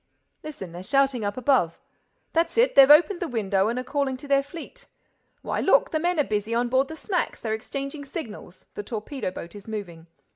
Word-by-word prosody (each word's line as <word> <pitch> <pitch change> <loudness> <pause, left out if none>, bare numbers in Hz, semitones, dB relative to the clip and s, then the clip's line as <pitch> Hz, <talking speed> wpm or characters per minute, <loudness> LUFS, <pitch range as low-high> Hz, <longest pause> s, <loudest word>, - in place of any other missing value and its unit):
"Listen—they're 190 - -8
shouting 270 +2 +1
up 205 +2 -2
above. 250 - +2 0.5
That's 330 +5 +1
it, 480 +2 +4
they've 275 0 +8
opened 345 +5 +6
the 350 - -2
window 200 -5 0
and 235 +2 -1
are 255 - -2
calling 270 0 -1
to 285 - -11
their 275 0 +4
fleet.—Why, 340 - -9
look, - - +3
the 315 - 0
men 350 +2 0
are - - +5
busy 215 -1 -2
on 240 +1 +1
board 260 +2 +2
the 320 - -7
smacks—they're 320 - -2
exchanging 275 +6 -5
signals.—The 210 - -8
torpedo 220 +4 -4
boat 170 -2 -9
is 205 0 -12
moving. 175 -7 -7
260 Hz, 180 wpm, -25 LUFS, 210-295 Hz, 0.5 s, they've